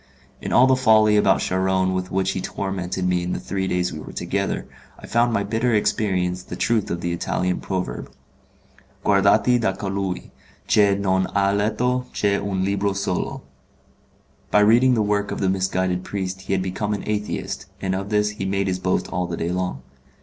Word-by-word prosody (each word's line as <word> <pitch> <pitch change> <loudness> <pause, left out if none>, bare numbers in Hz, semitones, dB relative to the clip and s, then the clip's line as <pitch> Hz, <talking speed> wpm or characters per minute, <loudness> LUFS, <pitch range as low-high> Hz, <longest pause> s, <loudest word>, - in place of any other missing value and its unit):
In - - -4
all 125 - +6
the 130 0 +4
folly 110 -4 +5
about 100 -2 +4
Charron 95 0 +1
with 90 0 -2
which 95 0 0
he 95 - -3
tormented 95 -2 -3
me 90 -1 +1
in 90 +1 -2
the - - -2
three 95 0 -3
days 90 -1 0
we 75 - -6
were - - -9
together, - - -2 0.3
I - - -12
found 120 +1 +2
by 100 -3 +1
bitter 115 +3 0
experience 95 -4 0
the - - -8
truth 115 -3 0
of 85 - -3
the 85 0 -1
Italian 90 +1 -1
proverb: 90 -11 -4 1.0
'Guardati 105 +5 +4
da 110 -4 +1
colui 95 -1 -4 0.3
che 100 -2 +4
non 95 -1 +1
ha 100 0 +3
letto 120 +5 0
che 100 -1 +1
un 95 -2 -2
libro 100 0 0
solo'. 95 -2 -2 1.1
By 105 - +4
reading 120 +4 +5
the 110 - +2
work 105 -1 0
of - - -4
the 95 - +1
misguided 95 -1 0
priest 95 -1 -4
he 95 - -3
had 95 -1 +1
become 105 +3 -2
an 100 - -6
Atheist, 105 -1 -3
and 95 -1 -2
of 95 +1 -3
this 105 0 +2
he 105 -2 -5
made 100 +1 0
his 95 -1 -1
boast 90 0 0
all 90 -1 -2
the 85 - -4
day 85 +1 -2
long. 90 -8 -3
95 Hz, 190 wpm, -22 LUFS, 95-105 Hz, 1.1 s, all